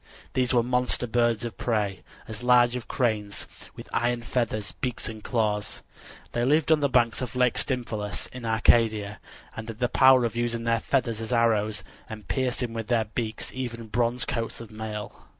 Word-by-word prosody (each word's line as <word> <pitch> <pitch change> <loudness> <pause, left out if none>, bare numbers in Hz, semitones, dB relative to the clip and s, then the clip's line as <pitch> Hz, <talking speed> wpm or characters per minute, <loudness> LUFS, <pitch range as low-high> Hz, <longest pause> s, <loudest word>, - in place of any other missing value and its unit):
These 130 -1 +1
were 120 -2 +4
monster 125 0 +1
birds 120 0 +1
of 115 - -7
prey, 105 -5 -1 0.3
as 110 0 -5
large 125 0 +5
as 125 -2 -4
cranes, 105 -5 -1 0.3
with - - -10
iron 120 0 0
feathers, 110 -4 -1
beaks 125 -2 -3
and 110 -2 -7
claws. 105 -4 -1 0.5
They 120 - -1
lived 150 +4 +3
on 155 - +6
the 140 -1 +1
banks 120 -2 +2
of 125 -1 -4
Lake 125 -2 +3
Stymphalus 110 -5 -1
in 125 -1 -8
Arcadia, 110 -2 +2 0.4
and 110 -1 -6
had 110 - -6
the 125 +1 +1
power 130 -2 +6
of 115 - -3
using 120 -1 -1
their 115 0 +2
feathers 115 -3 0
as 115 - -5
arrows 110 -3 +2 0.3
and 110 -3 -8
piercing 125 -2 -1
with 115 -1 -4
their 115 -3 +2
beaks 110 +1 -4
even 120 -3 -5
bronze 120 +2 0
coats 115 -1 -3
of 115 -2 -10
mail. 110 -1 -7
115 Hz, 180 wpm, -26 LUFS, 110-125 Hz, 0.5 s, on